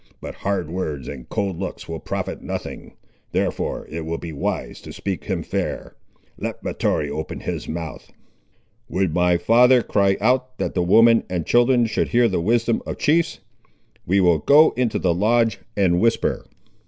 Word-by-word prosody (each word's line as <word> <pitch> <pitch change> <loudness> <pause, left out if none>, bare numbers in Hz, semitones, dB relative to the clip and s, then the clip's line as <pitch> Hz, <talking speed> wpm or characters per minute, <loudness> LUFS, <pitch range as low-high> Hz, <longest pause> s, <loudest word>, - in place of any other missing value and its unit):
But - - -7
hard 95 -5 -2
words 75 -8 -4
and 60 - -8
cold 95 -4 -2
looks 95 - -6
will 80 -1 -5
profit - - -4
nothing; - - -6 0.4
therefore - - -2
it 80 +1 -5
will 80 +1 -3
be 80 -1 -7
wise 70 - -3
to - - -10
speak 95 -3 -5
him - - -2
fair. - - -4 0.5
Let - - -5
Mahtoree 75 -1 -1
open 80 +2 -5
his - - -4
mouth." 80 -2 -6 0.8
"Would 95 -4 0
my 90 0 +3
father 125 +4 +5
cry 100 -1 +2
out, 130 +3 +1
that - - -2
the 90 - 0
women 115 +6 +5
and 90 -3 -2
children 120 0 +4
should 110 - -1
hear 120 0 +3
the 95 -5 -1
wisdom 115 +4 +1
of - - -6
chiefs! 165 +2 +1 0.7
We 95 +3 +3
will 85 -4 +4
go 145 - +6
into 125 -3 0
the 90 -2 +1
lodge 115 +5 +2 0.2
and 90 -3 +2
whisper." 115 0 0
100 Hz, 165 wpm, -22 LUFS, 85-120 Hz, 0.8 s, go